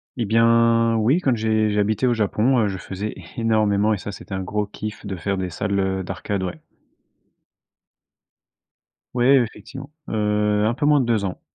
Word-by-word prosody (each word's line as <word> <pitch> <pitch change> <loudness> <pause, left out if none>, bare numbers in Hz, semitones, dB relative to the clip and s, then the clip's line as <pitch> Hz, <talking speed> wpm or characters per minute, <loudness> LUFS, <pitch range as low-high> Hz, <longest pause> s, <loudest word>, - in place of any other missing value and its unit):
Et 120 - -2
bien 115 +1 +3
oui, 115 +9 +2
quand 130 -7 +2
j'ai, 110 -1 +1
j'habitais 105 +4 +1
au 120 - +3
Japon, 110 +3 +1
heu. 110 - +2
je 95 - -4
faisais 100 +3 -5 0.2
énormément 110 -2 +2
et - - -1
ça, 100 - -6
c'était 100 - -10
un 95 - -2
gros 105 +3 -2
kiff 105 +1 -8
de 100 -1 -4
faire 100 +3 -2
des 95 -1 -3
salles, 100 +4 -2
heu, 95 0 -1
d'arcade, 95 +2 -4
ouais. 90 - -5 2.5
Ouais, 125 +3 +4
effectivement, 120 +5 -9 0.2
heu, 105 -1 +1
un 110 - +2
peu 135 - -2
moins 150 0 +5
de - - -1
2 115 -3 +1
ans. 90 - -4
105 Hz, 175 wpm, -22 LUFS, 100-115 Hz, 2.5 s, moins